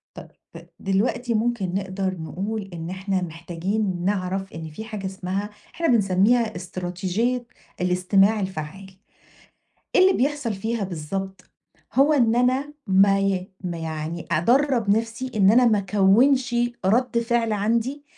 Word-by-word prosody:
طبَ -, -, -9 dB, 0.5 s
دلوقتي 230 Hz, +5 st, 0 dB
ممكن 220 Hz, -5 st, -1 dB
نقدَر 190 Hz, -1 st, -2 dB
نقول 195 Hz, +6 st, -4 dB
إن 165 Hz, 0 st, -6 dB
إحنا 190 Hz, 0 st, -2 dB
محتاجين 175 Hz, +3 st, -3 dB
نعرَف 195 Hz, -1 st, -2 dB
إن 160 Hz, 0 st, -7 dB
في 185 Hz, +9 st, -8 dB
حاجة 210 Hz, -3 st, -6 dB
إسمها، 190 Hz, +2 st, -3 dB, 0.3 s
إحنا 335 Hz, 0 st, 0 dB
بنسميها 220 Hz, +1 st, +3 dB
إستراتيجيّة 185 Hz, +7 st, -2 dB, 0.4 s
الاستماع 185 Hz, +4 st, +3 dB
الفعّال، 190 Hz, +1 st, -6 dB, 1.0 s
إيه -, -, +6 dB
اللي 380 Hz, +1 st, +6 dB
بيحصَل 275 Hz, -3 st, 0 dB
فيها 220 Hz, +2 st, -2 dB
بالضبط؟ 190 Hz, +2 st, -5 dB, 0.4 s
هو 280 Hz, +3 st, +4 dB
إن 235 Hz, -5 st, +3 dB
أنا 260 Hz, +4 st, +1 dB
ما 195 Hz, +1 st, +4 dB
ي 195 Hz, -1 st, -1 dB
ما 175 Hz, -2 st, -3 dB
يعني 160 Hz, +1 st, -5 dB
أدرّب 240 Hz, -, +2 dB
نفْسي 230 Hz, +3 st, -4 dB
إن 195 Hz, -1 st, +5 dB
أنا 245 Hz, +2 st, +5 dB
ما 220 Hz, -3 st, +4 dB
أكَوّنشِ 215 Hz, +7 st, +3 dB, 0.3 s
رَد 235 Hz, +3 st, +2 dB
فِعل 230 Hz, -1 st, 0 dB
عندي 230 Hz, +7 st, -1 dB
195 Hz, 130 wpm, -23 LUFS, 185-235 Hz, 1.0 s, إيه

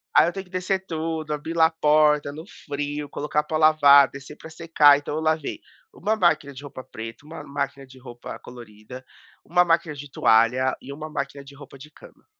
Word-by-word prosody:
aí -, -, +6 dB
eu 175 Hz, -, -2 dB
tenho 195 Hz, -1 st, -7 dB
que 180 Hz, -, -24 dB
descer 185 Hz, +1 st, -2 dB
tudo, 160 Hz, -1 st, -3 dB
abrir 160 Hz, +3 st, -5 dB
lá 160 Hz, -1 st, +5 dB
a -, -, -9 dB
porta 150 Hz, -2 st, +2 dB
no 160 Hz, +3 st, -9 dB, 0.2 s
frio, 145 Hz, 0 st, -4 dB
colocar 150 Hz, +1 st, -2 dB
pra 155 Hz, +1 st, -3 dB
lavar, 145 Hz, -3 st, +6 dB
descer 140 Hz, +2 st, -11 dB
pra 160 Hz, -, -12 dB
secar. 160 Hz, -3 st, +4 dB
Então 145 Hz, 0 st, -6 dB
eu 160 Hz, -, -2 dB
lavei 155 Hz, -2 st, -1 dB, 0.3 s
uma 220 Hz, -, -1 dB
máquina 155 Hz, -6 st, +1 dB
de 140 Hz, +2 st, -11 dB
roupa 130 Hz, -2 st, -9 dB
preta, 115 Hz, +5 st, -10 dB
uma 160 Hz, +1 st, -9 dB
máquina 140 Hz, -1 st, -5 dB
de 130 Hz, 0 st, -16 dB
roupa 120 Hz, -1 st, -10 dB
colorida, 120 Hz, +1 st, -12 dB, 0.4 s
uma 180 Hz, +1 st, +3 dB
máquina 165 Hz, -2 st, +1 dB
de 145 Hz, 0 st, -10 dB
toalha 120 Hz, +4 st, +3 dB
e 140 Hz, -, -9 dB
uma 155 Hz, +2 st, -8 dB
máquina 140 Hz, -1 st, -5 dB
de 140 Hz, 0 st, -14 dB
roupa 140 Hz, -1 st, -13 dB
de 150 Hz, +3 st, -14 dB
cama. -, -, -18 dB
150 Hz, 205 wpm, -23 LUFS, 140-160 Hz, 0.4 s, aí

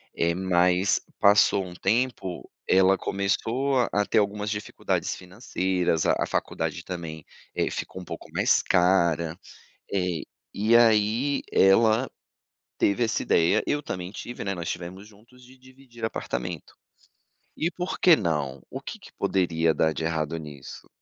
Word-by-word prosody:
eh, 85 Hz, 0 st, +1 dB
mas 90 Hz, +1 st, +2 dB, 0.2 s
passou 100 Hz, -1 st, +5 dB
um 90 Hz, -, -9 dB
tempo, 105 Hz, -3 st, -1 dB, 0.2 s
ela 95 Hz, +1 st, +5 dB
começou 120 Hz, +7 st, 0 dB
a 105 Hz, 0 st, +1 dB
ter 115 Hz, -, 0 dB
algumas 105 Hz, 0 st, -1 dB
dificuldades 105 Hz, 0 st, -2 dB
financeiras, 90 Hz, -3 st, -1 dB
a -, -, +3 dB
a -, -, +1 dB
faculdade -, -, -3 dB
também, 80 Hz, -4 st, -6 dB, 0.3 s
eh, -, -, 0 dB
ficou 95 Hz, -, -6 dB
um 90 Hz, -, -11 dB
pouco -, -, -8 dB
mais -, -, +3 dB
cara, 85 Hz, -3 st, +2 dB, 0.6 s
eh, 90 Hz, -4 st, 0 dB, 0.3 s
e 110 Hz, +3 st, +2 dB
aí 115 Hz, +4 st, +3 dB
ela 110 Hz, +5 st, +4 dB, 0.7 s
teve 100 Hz, +4 st, +2 dB
essa 115 Hz, -, -1 dB
ideia, 85 Hz, +6 st, +3 dB
eu 145 Hz, 0 st, 0 dB
também 90 Hz, -8 st, -5 dB
tive, 120 Hz, +2 st, -7 dB
né, 100 Hz, -, -1 dB
nós 85 Hz, -2 st, -5 dB
tivemos 90 Hz, +3 st, -6 dB
juntos 120 Hz, +4 st, -20 dB
de 130 Hz, +1 st, -17 dB
dividir 130 Hz, -2 st, -12 dB
apartamento, 60 Hz, -, -4 dB, 0.8 s
e 165 Hz, -, 0 dB
por 180 Hz, 0 st, -4 dB
que 175 Hz, -3 st, +7 dB
não? 75 Hz, -8 st, -2 dB
O -, -, -6 dB
que -, -, -8 dB
que -, -, -15 dB
poderia 85 Hz, -3 st, +1 dB
dar 80 Hz, +1 st, +2 dB
de -, -, -4 dB
errado 80 Hz, -1 st, -1 dB
nisso? 75 Hz, -3 st, -10 dB
95 Hz, 145 wpm, -26 LUFS, 85-115 Hz, 0.8 s, que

